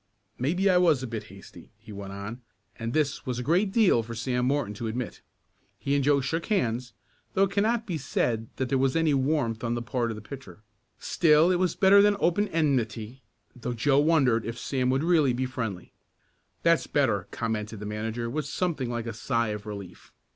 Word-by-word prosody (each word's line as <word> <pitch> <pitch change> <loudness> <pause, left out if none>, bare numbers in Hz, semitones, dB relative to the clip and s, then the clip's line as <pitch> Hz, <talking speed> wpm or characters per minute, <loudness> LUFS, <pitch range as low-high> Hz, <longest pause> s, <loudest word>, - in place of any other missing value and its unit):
Maybe 175 +10 +1
I 185 -2 +5
was 160 -7 +3
a - - -1
bit 115 -2 -5
hasty," 95 +1 -14
he 110 - -14
went 100 -1 -7
on, 100 +5 -7 0.3
and 115 0 -4
this 145 -1 -1
was 125 -2 -2
a 125 - -3
great 180 - +2
deal 200 - +4
for 115 +1 -7
Sam 125 +2 -1
Morton 135 -6 0
to 115 +3 -5
admit. 120 +1 -4 0.6
He 140 - -2
and 140 -1 +2
Joe 140 0 +3
shook 165 +5 -2
hands, 125 - -1 0.4
though 195 - +4
it 195 - +1
cannot 220 +3 +1
be 175 -7 -3
said 115 -4 -1
that 130 - -2
there 135 0 +2
was 135 0 +1
any 165 -2 +3
warmth 130 -5 0
on 120 0 0
the 120 - -2
part 120 -1 -1
of 115 - -4
the 110 - -8
pitcher. 105 -5 -11 0.3
Still 160 +1 +4
it 180 - +1
was 180 -3 +1
better 200 +1 +6
than 205 0 +4
open 205 +5 +2
enmity, 130 - -1 0.3
though 125 0 -4
Joe 135 +4 +3
wondered 140 -7 +3
if 115 0 -5
Sam 125 0 -1
would 130 +2 +2
be - - -2
really 135 -7 +3
friendly. 115 -8 -5 0.7
"That's - - +3
better," - - +1
commented 110 -2 -3
the 105 - -6
manager 110 +3 -3
with 150 +4 -3
something 150 -6 -2
like 120 -1 -3
a 115 - -4
sigh 115 +1 -1
of 105 0 -5
relief. 100 -4 -9
130 Hz, 205 wpm, -27 LUFS, 115-155 Hz, 0.7 s, better